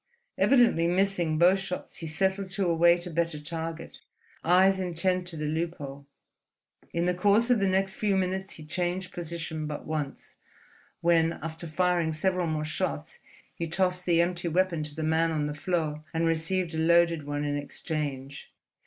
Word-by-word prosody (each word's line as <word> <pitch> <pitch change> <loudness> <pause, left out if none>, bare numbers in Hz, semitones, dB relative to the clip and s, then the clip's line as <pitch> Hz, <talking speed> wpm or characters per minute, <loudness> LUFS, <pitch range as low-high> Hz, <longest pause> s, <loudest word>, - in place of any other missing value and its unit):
Evidently 235 -11 +4
missing 180 -3 +1
both 180 +4 +5
shots, 180 -1 -5
he 165 - -5
settled 190 +4 0
to 195 +1 -1
await 170 +1 +4
a 175 - -6
better 165 -1 -1
target, 165 +2 -6 0.4
eyes 190 +3 +4
intent 180 0 0
to 170 -2 -5
the 150 - -3
loophole. 150 -3 -4 0.8
In 170 +1 0
the 180 - +2
course 205 +6 +3
of 240 - +4
the 195 - +2
next 190 +1 +1
few 205 -2 +1
minutes 190 +1 -2
he 155 - -10
changed 180 +3 -2
position 165 -2 -4
but 150 -1 -6
once, 150 -3 -4 0.7
when, 165 -1 +3
after 165 +1 -6
firing 170 0 +1
several 180 +2 0
more 155 -1 -1
shots, 155 -1 -3 0.3
he 170 - -4
tossed 180 +1 0
the 170 -1 +4
empty 175 0 -1
weapon 175 -1 +1
to 150 -1 -6
the 160 - -3
man 160 +1 +2
on 155 -2 -1
the 150 - -3
floor 155 -1 -2
and 165 +1 +1
received 165 +2 0
a 160 - -2
loaded 170 -2 +3
one 145 0 -2
in 145 0 -1
exchange. 145 -2 -5
170 Hz, 170 wpm, -28 LUFS, 155-185 Hz, 0.8 s, both